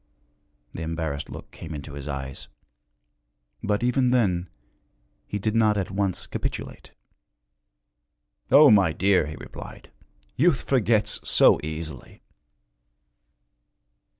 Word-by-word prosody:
The - - -7
embarrassed 80 -3 -4
look - - -10
came 80 - -8
into 75 0 -8
his 70 0 -7
eyes. 70 -1 -6 1.1
But, 105 +2 -1
even 125 +1 +2
then, 95 -8 +1 0.8
he 105 - -3
did 105 +2 -1
not 110 -2 +3
at 95 -2 -2
once 95 -1 -2
capitulate. - - -6 1.6
'O 140 +1 +8
my 95 -6 +4
dear,' 95 -2 +2
he 75 - -6
replied, - - -11 0.4
'youth 150 +1 +2
forgets 115 -5 +2
so - - +5
easily!' 80 -2 -7
95 Hz, 105 wpm, -25 LUFS, 80-110 Hz, 1.6 s, O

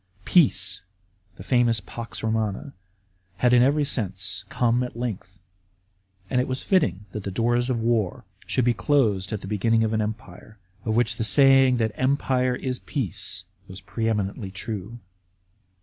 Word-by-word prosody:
Peace 95 - +3 0.5
(the 90 - -10
famous 120 0 +2
pax 115 +5 -8
Romano) 110 +3 -1 0.7
had 125 +5 +3
in 120 - +6
every 145 +3 +3
sense 95 -7 -2
come 120 0 +1
at 125 -2 -5
length, 100 -6 -5 0.9
and 125 +6 +1
it - - -3
was 130 0 -3
fitting 140 - +1
that 105 - -5
the 100 - -4
doors 120 +5 +1
of 125 -3 0
war 115 -5 0 0.2
should 130 - +1
be 120 - +4
closed 105 -4 +1
at 105 -2 -3
the 95 - -8
beginning 110 +2 +2
of 110 0 0
an 110 - +1
empire, 105 -1 -7 0.3
of 110 -1 0
which 115 -1 +1
the - - -1
saying 135 +1 +5
that 110 -2 0
" - - -25
Empire 130 -1 +1
is 125 0 -3
peace," 100 - -4
* 95 -1 -36
was 95 0 -9
pre 110 +4 -3
eminently 100 -1 -2
true. 100 +3 -6
115 Hz, 165 wpm, -24 LUFS, 100-125 Hz, 0.9 s, in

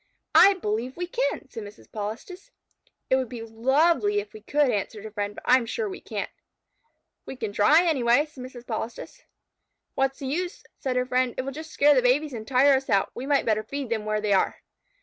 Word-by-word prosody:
"I 400 0 +8
believe 240 - -3
we 355 - -2
can," 470 - -2
said 235 -4 -8
Mrs. 205 0 -12
Polistes. 225 - -6 0.6
"It 260 - +5
would 260 -3 -2
be 235 -3 -7
lovely 230 -1 +2
if 205 +1 -8
we 215 - -11
could," 285 +4 +2
answered 205 +1 -3
her 220 - -8
friend, 205 -1 -3
"but - - -10
I 255 - +6
am 235 -3 -3
sure 450 - -2
we 380 -1 -7
can't." - - -5 1.0
"We - - -6
can 220 -5 -4
try 300 +12 +5
it, - - 0
anyway," 265 -2 +3
said 290 -5 -11
Mrs. 250 -1 -10
Polistes. 235 - -6 0.7
"What 270 0 +1
is - - -26
the 275 - -7
use?" 350 +7 -3 0.2
said 260 -2 -2
her 250 0 +1
friend. 255 -1 0
"It 255 - -1
will 275 - -4
just 315 +3 -8
scare 295 -1 +4
the 260 - +4
babies 270 +4 +2
and 220 -2 -7
tire 270 +2 +5
us 265 - -6
out. 195 -1 +2
We 255 +3 -6
might 285 -1 +2
better 215 -1 +2
feed 265 +2 -6
them 220 -2 -1
where 215 0 -1
they 210 -1 +1
are." 190 - +1
255 Hz, 225 wpm, -26 LUFS, 220-290 Hz, 1.0 s, I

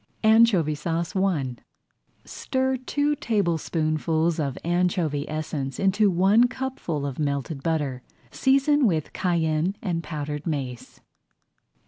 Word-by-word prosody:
ANCHOVY 220 -8 +5
SAUCE 165 +4 -3
I 155 -11 0 0.7
Stir 260 0 -1
two 290 +4 0
tablespoonfuls 165 - 0
of 140 -4 -2
anchovy 170 -4 0
essence 150 -4 -4
into 200 +2 +3
one 195 +7 +4
cupful 245 - -4
of 140 -1 -5
melted 140 0 -2
butter. 145 -5 -1 0.3
Season 275 0 +3
with 160 -6 -1
cayenne 170 0 0
and 175 -5 -2
powdered 150 -1 -5
mace. 130 -6 -5
165 Hz, 105 wpm, -25 LUFS, 150-205 Hz, 0.7 s, ANCHOVY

